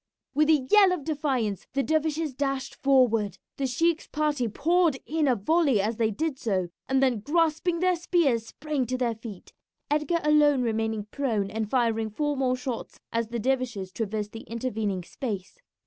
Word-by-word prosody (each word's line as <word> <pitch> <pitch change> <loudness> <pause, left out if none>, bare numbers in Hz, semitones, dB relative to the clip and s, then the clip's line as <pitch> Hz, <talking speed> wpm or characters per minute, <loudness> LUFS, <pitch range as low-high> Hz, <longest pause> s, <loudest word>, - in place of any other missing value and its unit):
With 305 +1 +3
a 290 -5 +3
yell 405 -3 +7
of 355 -5 -2
defiance 270 - -1
the 275 +1 +1
dervishes 315 -1 0
dashed 275 0 -2
forward. 235 -8 +2 0.2
The 275 - 0
sheik's 325 +6 +1
party 295 -5 0
poured 325 - +2
in 310 -1 0
a 255 - +4
volley 280 - +2
as 215 +3 -1
they 225 -2 +2
did 275 +5 -2
so, 190 -6 -1 0.2
and 265 0 +3
then 250 -4 +2
grasping 330 - +1
their 365 0 +3
spears 305 -10 +1
sprang 295 -3 -3
to 255 +2 -1
their 245 -2 0
feet, 220 -4 -10 0.4
Edgar 300 +3 +1
alone 295 -3 +4
remaining 220 -2 -1
prone, 225 -8 -1
and 220 -1 -3
firing 225 -3 +1
four 295 +7 -1
more 260 -2 +1
shots 250 -2 -5
as 230 0 0
the 235 +1 -4
dervishes 235 -6 -1
traversed 210 0 -3
the 225 - -8
intervening 220 -5 -2
space. 200 - -6
260 Hz, 170 wpm, -27 LUFS, 225-300 Hz, 0.4 s, yell